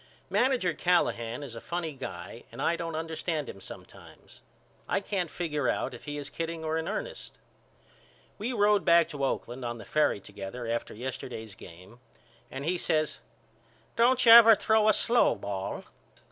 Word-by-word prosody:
Manager 225 Hz, -3 st, +2 dB
Callahan 145 Hz, -8 st, 0 dB
is 130 Hz, -5 st, -8 dB
a 115 Hz, -, -7 dB
funny 170 Hz, -2 st, -3 dB
guy 135 Hz, -, -8 dB
and -, -, -11 dB
I 170 Hz, -, +1 dB
don't 165 Hz, -1 st, -4 dB
understand 160 Hz, -1 st, -3 dB
him 95 Hz, -, -9 dB
sometimes. -, -, -13 dB, 0.5 s
I -, -, +2 dB
can't 195 Hz, -4 st, -2 dB
figure 150 Hz, -7 st, -2 dB
out -, -, -1 dB
if 120 Hz, -, -11 dB
he 145 Hz, -1 st, -5 dB
is 145 Hz, -, -5 dB
kidding 165 Hz, -1 st, -5 dB
or 155 Hz, 0 st, -1 dB
in 160 Hz, +1 st, -2 dB
ernest. -, -, -5 dB, 1.0 s
We 225 Hz, +5 st, -2 dB
road 205 Hz, -4 st, +3 dB
back 170 Hz, 0 st, +5 dB
to 145 Hz, -4 st, -5 dB
Oakland 130 Hz, -1 st, -2 dB
on 120 Hz, 0 st, -3 dB
the 110 Hz, -, -10 dB
ferry 150 Hz, -8 st, +1 dB
together 100 Hz, +4 st, -8 dB
after 115 Hz, -1 st, -3 dB
yesterday's 115 Hz, -3 st, -6 dB
game 95 Hz, +6 st, -14 dB, 0.5 s
and 135 Hz, +1 st, -6 dB
he 175 Hz, +2 st, 0 dB
says 155 Hz, -1 st, 0 dB, 0.8 s
Don't 250 Hz, +2 st, +3 dB
you 230 Hz, -, +9 dB
never 230 Hz, -1 st, +10 dB
throw 220 Hz, +1 st, +3 dB
a 215 Hz, -, +6 dB
slow 240 Hz, +3 st, +3 dB
ball? 95 Hz, -1 st, -5 dB
155 Hz, 165 wpm, -29 LUFS, 120-180 Hz, 1.0 s, never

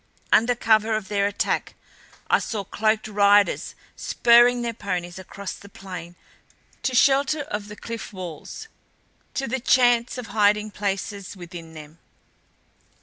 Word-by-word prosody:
Under 240 Hz, +2 st, +4 dB
cover 220 Hz, -1 st, +2 dB
of 215 Hz, -3 st, -4 dB
their 200 Hz, -1 st, +1 dB
attack 205 Hz, -, -2 dB, 0.5 s
I -, -, +4 dB
saw 210 Hz, -3 st, -4 dB
cloaked 215 Hz, +3 st, 0 dB
riders 205 Hz, -1 st, +3 dB, 0.2 s
spurring 240 Hz, +1 st, +4 dB
their 235 Hz, -1 st, -2 dB
ponies 180 Hz, -4 st, -4 dB
across 195 Hz, +1 st, -7 dB
the 200 Hz, -, -13 dB
plain 180 Hz, -3 st, -9 dB, 0.7 s
to 260 Hz, -, -1 dB
shelter 280 Hz, +4 st, +3 dB
of 210 Hz, -7 st, -5 dB
the 210 Hz, -, -9 dB
cliff 230 Hz, +1 st, -7 dB
walls, 185 Hz, -, -8 dB, 0.7 s
to 270 Hz, -, -2 dB
the 260 Hz, +3 st, -2 dB
chance 245 Hz, -1 st, +3 dB
of 250 Hz, -, -5 dB
hiding 210 Hz, 0 st, +2 dB
places 200 Hz, -1 st, -4 dB
within 170 Hz, -2 st, -10 dB
them. 155 Hz, +1 st, -12 dB
210 Hz, 135 wpm, -24 LUFS, 190-235 Hz, 0.7 s, Under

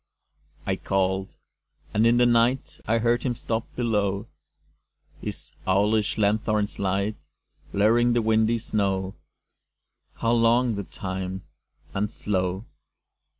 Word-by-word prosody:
I -, -, 0 dB
called. 95 Hz, 0 st, -1 dB, 0.6 s
And 110 Hz, +2 st, +4 dB
in 120 Hz, +1 st, +4 dB
the 120 Hz, -, +5 dB
night 120 Hz, +2 st, +2 dB
I 115 Hz, -, +3 dB
heard 120 Hz, +1 st, +2 dB
him 125 Hz, -2 st, -1 dB
stop 115 Hz, 0 st, -3 dB
below, 105 Hz, -4 st, 0 dB, 1.0 s
His -, -, -6 dB, 0.2 s
owlish 105 Hz, +3 st, +2 dB
lanthorn's 105 Hz, 0 st, +1 dB
light 100 Hz, +2 st, 0 dB, 0.5 s
Blurring 115 Hz, +4 st, +3 dB
the 120 Hz, -1 st, +2 dB
windy 110 Hz, +1 st, +3 dB
snow 95 Hz, -3 st, -1 dB, 1.0 s
How 115 Hz, -, 0 dB
long 120 Hz, +1 st, +3 dB
the 100 Hz, -2 st, -4 dB
time 95 Hz, 0 st, -5 dB, 0.5 s
and 105 Hz, +2 st, 0 dB
slow! 95 Hz, 0 st, -2 dB
105 Hz, 110 wpm, -25 LUFS, 95-115 Hz, 1.0 s, the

